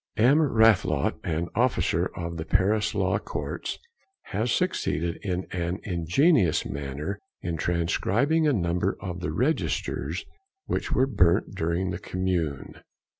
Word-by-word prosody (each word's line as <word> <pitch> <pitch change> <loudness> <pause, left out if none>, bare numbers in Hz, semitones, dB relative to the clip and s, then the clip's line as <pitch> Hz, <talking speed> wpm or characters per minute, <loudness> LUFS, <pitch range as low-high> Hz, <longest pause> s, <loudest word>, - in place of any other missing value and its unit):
"M. 130 +8 +5
Rathelot, 110 - +3
an 85 +1 -2
officer 95 -7 +1
of 85 -1 -4
the 80 - -3
Paris 100 +4 +1
Law - - +1
Courts, - - -4 0.5
has 115 +3 -2
succeeded 85 +3 0
in 95 -3 -2
an 85 0 -2
ingenious 90 - +2
manner 70 +7 -4 0.2
in 85 -1 -2
transcribing 100 - +1
a - - +4
number 90 -1 0
of 90 -2 -5
the 90 -3 -3
registers 85 - -1 0.4
which - - -2
were 130 - +3
burnt 95 -7 +2
during 90 +1 -1
the 85 - -4
Commune. 90 -8 -2
90 Hz, 125 wpm, -26 LUFS, 85-110 Hz, 0.5 s, M